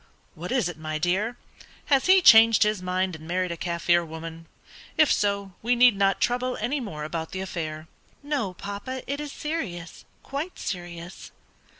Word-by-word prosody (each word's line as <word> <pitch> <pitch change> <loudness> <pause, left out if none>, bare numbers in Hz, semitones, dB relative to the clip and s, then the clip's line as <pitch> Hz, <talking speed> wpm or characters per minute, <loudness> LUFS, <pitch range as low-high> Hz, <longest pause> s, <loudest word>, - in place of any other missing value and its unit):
"What 175 +6 -7
is 250 -8 +2
it, 175 -3 -7
my 155 0 -3
dear; 190 +9 0 0.5
has 275 +1 +2
he 375 0 +6
changed 225 -4 +8
his 210 -2 0
mind 185 0 -1
and 160 0 -11
married 180 +1 -1
a - - -3
Kaffir 170 0 +1
woman? 165 0 -8 0.5
If 310 - +5
so, 200 -1 0
we 245 +3 +2
need 245 -2 +6
not 195 0 +2
trouble 250 +1 0
any 245 +7 -1
more 160 - -6
about 160 +2 -5
the 190 - -3
affair." 160 -4 -5 0.4
"No, 275 -11 -2
papa; 205 +8 -6
it 280 +1 -3
is 295 -1 -5
serious 195 - -5 0.2
quite 295 +6 -5
serious." 175 -1 -6
190 Hz, 170 wpm, -26 LUFS, 170-245 Hz, 0.5 s, changed